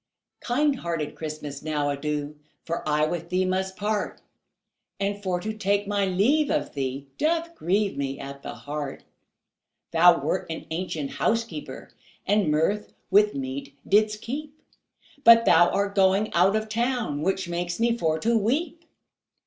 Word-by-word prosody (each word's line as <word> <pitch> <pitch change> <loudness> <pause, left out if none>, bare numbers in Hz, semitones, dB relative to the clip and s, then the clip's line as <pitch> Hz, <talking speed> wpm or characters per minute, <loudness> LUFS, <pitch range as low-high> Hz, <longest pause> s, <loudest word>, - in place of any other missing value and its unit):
Kind 280 +3 +1
hearted 165 -7 -3
Christmas, 150 -2 -6
now 150 -2 -1
adieu, 150 +1 -3 0.3
For 170 +1 -3
I 150 0 +3
with 170 +1 -4
thee 185 +1 +1
must 190 +1 -1
part, 210 0 -2 0.8
And 200 +1 -2
for 185 -3 -1
to 215 +4 -4
take 205 -1 0
my 200 -1 +1
leave 255 +12 +2
of 145 - -1
thee 135 0 -3
Doth 335 +2 0
grieve 200 - 0
me 135 -1 -3
at 140 0 -8
the - - -7
heart; 145 -1 -6 0.9
Thou 170 +1 +6
wert 155 +7 -1
an 160 - -5
ancient 160 -4 -3
housekeeper, 230 +6 -2 0.3
And 205 -5 +2
mirth 165 +8 0 0.2
with 210 +1 +5
meat 135 +1 -5
didst 210 +1 +2
keep, 290 +4 -6 0.6
But 230 0 +8
thou 175 +1 +6
art 200 0 0
going 195 +1 +3
out 185 +4 +4
of 215 0 -1
town, 230 - -1
Which 190 +2 0
makes 175 +1 -3
me 235 0 +2
for 160 -7 0
to 235 +1 +2
weep. 285 +10 0
190 Hz, 150 wpm, -25 LUFS, 155-215 Hz, 0.9 s, But